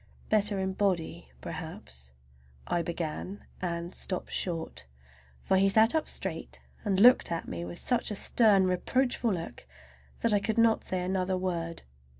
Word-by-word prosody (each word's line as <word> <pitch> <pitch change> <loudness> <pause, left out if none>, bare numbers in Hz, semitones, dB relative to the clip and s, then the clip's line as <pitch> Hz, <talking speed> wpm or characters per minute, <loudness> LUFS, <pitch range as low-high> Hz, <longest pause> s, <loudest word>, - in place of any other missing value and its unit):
"Better 210 -1 +3
in 190 0 -1
body 185 - -1
perhaps"—I 65 - -7
began, 170 +3 -4 0.2
and 170 0 -3
stopped 185 - -4
short, 165 - -3 0.6
for 190 - +3
he 195 +1 +4
sat 220 +3 +5
up 315 -1 0
straight - - -4 0.2
and 195 -3 +1
looked 245 -1 +6
at 165 - -3
me 85 0 -4
with 85 0 -7
such 245 -1 0
a 210 - -3
stern, 200 -2 +4
reproachful 240 +6 +1
look 165 - -5 0.5
that 230 - +2
I 205 - +4
could 220 +2 -1
not 230 -1 +4
say 185 -1 -2
another 185 0 0
word. 170 -3 -3
185 Hz, 150 wpm, -29 LUFS, 165-205 Hz, 0.6 s, looked